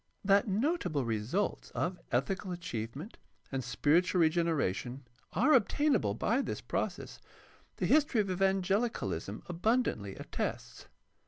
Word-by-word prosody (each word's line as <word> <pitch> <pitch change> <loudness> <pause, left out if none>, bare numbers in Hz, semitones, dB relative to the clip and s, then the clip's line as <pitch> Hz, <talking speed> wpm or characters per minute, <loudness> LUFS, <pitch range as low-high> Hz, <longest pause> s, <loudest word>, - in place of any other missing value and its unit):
That 200 +1 +4
notable 200 - 0
results 115 - -1
of 180 0 -1
ethical 185 +10 -1
achievement 145 - -6 0.3
and 135 -1 -2
spiritual 170 +8 +2
regeneration 145 - 0 0.3
are 265 +9 +4
obtainable 245 - +3
by 235 - +1
this - - -4
process - - -4 0.6
the - - -1
history 295 -6 +3
of 205 - +2
evangehcalism 190 - 0
abundantly 175 - 0
attests. - - -5
180 Hz, 105 wpm, -32 LUFS, 130-210 Hz, 0.6 s, That